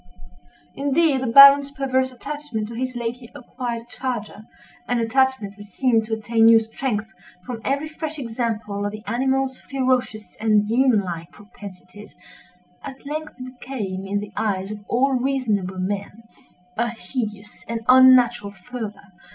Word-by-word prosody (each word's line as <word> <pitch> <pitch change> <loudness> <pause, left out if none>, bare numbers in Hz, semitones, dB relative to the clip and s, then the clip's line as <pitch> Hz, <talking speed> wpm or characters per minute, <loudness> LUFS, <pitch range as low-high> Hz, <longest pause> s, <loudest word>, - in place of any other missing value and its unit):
Indeed, 285 0 +1
the 260 - -2
Baron's 275 +3 +9
perverse 260 -1 -1
attachment 265 -4 -5
to - - -8
his 255 +2 -4
lately 240 0 -5
acquired 240 -2 -6
charger—an 240 0 -6
attachment 235 -3 +1
which 205 0 -12
seemed 225 +2 +1
to 220 - -1
attain 225 +1 +2
new 230 0 +8
strength 225 -1 -3 0.3
from 240 -3 -6
every 280 +3 -1
fresh 315 0 -6
example 225 -5 -3
of 205 - -2
the 215 0 -8
animal's 265 +3 0
ferocious 255 -5 -2
and 210 -1 +2
demon 240 -1 +3
like 170 -3 -6
propensities—at 205 +2 -14
length 305 +2 -5
became, 240 -7 -6
in 205 +1 -1
the 210 +1 -9
eyes 195 -2 -2
of 210 -1 -8
all 265 +3 +2
reasonable 245 -8 -1
men, 200 +3 -4 0.5
a 235 +1 +1
hideous 210 -1 -6
and 230 0 -3
unnatural 255 -4 +6
fervor. 205 -1 -8
235 Hz, 135 wpm, -22 LUFS, 210-260 Hz, 0.5 s, Baron's